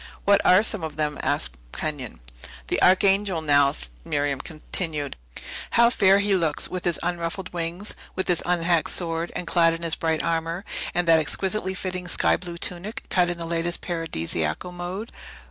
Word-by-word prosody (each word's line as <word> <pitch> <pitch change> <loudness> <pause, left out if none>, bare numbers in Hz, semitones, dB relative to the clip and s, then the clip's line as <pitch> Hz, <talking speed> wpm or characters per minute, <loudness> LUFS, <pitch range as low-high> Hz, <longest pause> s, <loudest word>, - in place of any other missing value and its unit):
"What 200 0 +5
are 185 +3 +6
some 215 -5 -1
of 155 -2 -4
them?" 150 -1 -1
asked 60 0 -1 0.2
Kenyon. 140 - -4 0.5
"That - - +1
Archangel, 195 -1 +4
now," 145 -3 +4 0.3
Miriam 145 - -1
continued; 155 -2 -3 0.6
"how 235 0 +6
fair 195 -5 +5
he 200 0 +2
looks, 165 -5 +1
with 185 -1 -5
his 175 -2 +1
unruffled 175 +2 -3
wings, 175 +4 -4 0.2
with 190 - -2
his 175 -2 +2
unhacked 170 -2 +2
sword, 165 -1 0
and 180 - -3
clad 165 -1 +3
in 165 - -8
his 165 -1 0
bright 160 -1 0
armor, 165 +3 -1 0.3
and 175 -1 +1
that 165 -1 +7
exquisitely 190 +5 0
fitting 185 -1 -4
sky - - +2
blue 175 -2 -6
tunic, 180 +5 -4
cut 180 -1 +3
in 175 - -2
the 170 - -5
latest 170 +1 -1
Paradisiacal 85 - -2
mode! 180 +5 -5
170 Hz, 165 wpm, -25 LUFS, 160-185 Hz, 0.6 s, that